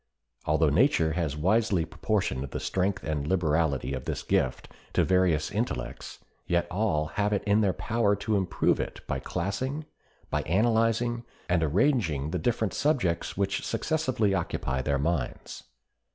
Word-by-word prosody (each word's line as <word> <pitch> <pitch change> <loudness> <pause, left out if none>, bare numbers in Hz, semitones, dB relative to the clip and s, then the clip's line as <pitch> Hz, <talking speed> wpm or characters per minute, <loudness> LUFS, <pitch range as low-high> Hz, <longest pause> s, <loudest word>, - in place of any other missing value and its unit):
Although - - +3
nature 80 -1 +3
has 80 -4 -1
wisely 95 +1 +2
proportioned 90 -6 -1
the - - -4
strength 95 +1 -1
and 75 -2 -2
liberality 80 -6 +1
of 65 - -4
this - - -3
gift 65 - 0 0.3
to - - +3
various 90 -4 +2
intellects, 100 - -3 0.3
yet 85 0 +2
all 90 -6 +1
have 100 +7 -1
it 100 - 0
in 105 +1 +3
their 100 -3 +3
power 110 -1 +1
to 110 +1 -1
improve 95 -3 +1
it - - -4
by - - -2
classing, 130 - -3 0.5
by 75 - +1
analyzing 115 +6 +1 0.2
and 90 -2 +2
arranging 80 - +1
the 90 - -1
different 110 +2 0
subjects 115 - 0
which 100 0 0
successively 130 -11 0
occupy 70 -7 -1
their 70 +2 0
minds. 75 -3 -3
95 Hz, 145 wpm, -28 LUFS, 80-110 Hz, 0.5 s, Although